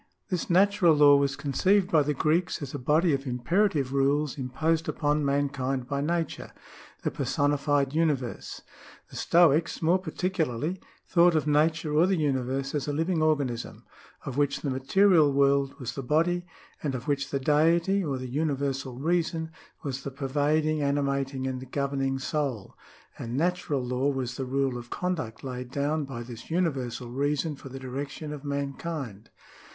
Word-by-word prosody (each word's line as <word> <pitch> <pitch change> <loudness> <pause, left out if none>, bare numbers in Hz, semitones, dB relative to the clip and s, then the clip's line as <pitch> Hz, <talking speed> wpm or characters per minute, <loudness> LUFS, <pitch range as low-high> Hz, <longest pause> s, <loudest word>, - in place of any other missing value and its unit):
This 180 -4 -2
natural 190 -2 +4
law 145 -1 +7
was 140 -1 +2
conceived 185 +7 +1
by 155 - +5
the 150 0 -1
Greeks 160 +5 +1
as 135 - -7
a 145 - -4
body 155 +6 +3
of 135 0 -2
imperative 135 +3 +1
rules 140 +1 +1
imposed 155 +5 -1
upon 150 0 0
mankind 140 -2 -1
by 140 +1 -1
Nature, 165 +1 -2 0.5
the - - 0
personified 145 +1 +1
universe. 150 -7 -1 0.5
The - - -11
Stoics, 170 -1 +3
more 170 +3 +3
particularly, 170 -3 -2 0.3
thought 175 -1 +4
of 155 - +1
Nature 155 +1 +2
or 160 +4 +4
the 190 - +2
Universe 135 -2 -1
as 145 -2 -2
a 145 - -1
living 165 +2 0
organism, 140 -7 -1 0.4
of 135 -1 -5
which 140 -1 +1
the 140 - -2
material 155 +4 +4
world 140 +1 +2
was 125 - -4
the 135 - -5
body, 170 +6 +1 0.3
and 140 -3 -2
of 125 -1 -6
which 140 -1 0
the 140 - -1
Deity 165 +7 +3
or 140 -5 -2
the 130 0 -5
Universal 135 -2 -2
Reason 160 +1 -1 0.3
was 135 -2 -3
the 140 - -5
pervading, 150 +3 0
animating, 140 -1 -1
and 130 -1 -5
governing 135 -1 -1
soul; 135 -6 -3 0.4
and 120 +2 -4
natural 160 -5 0
law 125 +3 0
was 130 -3 -2
the 135 - -3
rule 130 -1 -1
of 120 0 -11
conduct 160 -12 -3
laid 125 -2 -5
down 145 +3 -1
by 125 -3 -6
this 120 -1 -10
Universal 135 -8 -2
Reason 145 +3 -1
for 135 - -11
the 135 - -8
direction 140 +3 -5
of 145 -2 -8
mankind. 140 -5 -4
145 Hz, 160 wpm, -27 LUFS, 135-160 Hz, 0.5 s, law